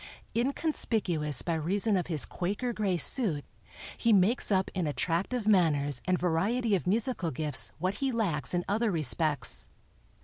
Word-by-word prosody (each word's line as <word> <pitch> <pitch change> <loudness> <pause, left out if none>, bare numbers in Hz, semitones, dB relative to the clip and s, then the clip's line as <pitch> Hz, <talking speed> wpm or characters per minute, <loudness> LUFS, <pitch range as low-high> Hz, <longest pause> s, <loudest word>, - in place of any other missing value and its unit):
Inconspicuous 220 - 0
by 170 - -1
reason 195 +7 0
of 180 - -1
his 155 -5 +1
Quaker 205 +7 -3
gray 200 -5 -1
suit, 170 - +3 0.5
he 230 - +1
makes 210 +4 +2
up 190 -1 +1
in 180 -4 -2
attractive 185 - -2
manners 145 -9 +2
and 185 0 +1
variety 205 +8 0
of 185 -2 0
musical 215 -2 0
gifts 150 0 +1
what 185 +5 -2
he 270 -1 -1
lacks 180 - -1
in 175 - -1
other 220 +3 0
respects. 155 - +1
185 Hz, 145 wpm, -29 LUFS, 160-220 Hz, 0.5 s, suit